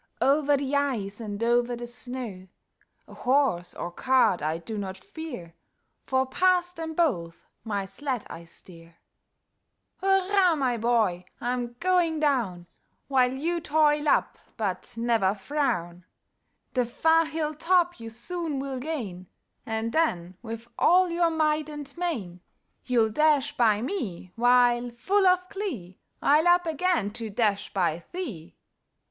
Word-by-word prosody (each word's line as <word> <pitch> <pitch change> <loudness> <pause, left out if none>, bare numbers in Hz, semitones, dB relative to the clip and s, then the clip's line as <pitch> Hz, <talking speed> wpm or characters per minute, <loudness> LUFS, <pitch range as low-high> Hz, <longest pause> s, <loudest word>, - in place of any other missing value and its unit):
Over 285 +1 +3
the 275 0 -2
ice, 235 -8 -1
and 210 -1 -4
over 240 +1 +2
the 240 0 -6
snow; 240 -6 -7 0.6
A - - -13
horse 255 -10 +1
or 175 - -5
cart 255 -3 +2
I 155 +2 -1
do 215 +7 -7
not 195 -2 -4
fear. 245 - -8 0.5
For 260 0 +2
past 360 +5 +2
them 320 -1 -5
both 180 - -1 0.2
my 205 -3 -2
sled 250 +4 -4
I 170 - -9
steer. 165 -1 -15 1.1
Hurra! 385 -2 +3
my 260 -4 +1
boy! 220 -6 +1
I'm 240 0 -2
going 350 -3 +2
down, 235 - 0 0.4
While 255 -2 +3
you 335 +6 -1
toil 300 -1 +2
up; - - +1 0.2
but 195 -5 -3
never 225 -4 +2
frown; 180 - -2 0.7
The 250 - +2
far 325 +6 +3
hill 310 0 -2
top 350 +1 +2
you 230 0 -7
soon 315 +6 -3
will 270 -1 -4
gain, 230 - -5 0.4
And 225 0 -2
then, 185 - 0
with 230 0 -7
all 360 +1 +5
your 340 0 +2
might 310 -1 +1
and 295 -2 -8
main, 230 - -3 0.5
You'll 235 -3 +3
dash 295 +2 +2
by 220 -4 +3
me; 220 - -4
while, 245 0 +4
full 380 +12 +1
of 365 0 +3
glee, 260 - -5 0.2
I'll 305 +4 +4
up 350 0 +5
again 325 - 0
to 225 0 -6
dash 205 -1 0
by 175 -3 0
thee! 240 - -6
250 Hz, 140 wpm, -27 LUFS, 205-315 Hz, 1.1 s, all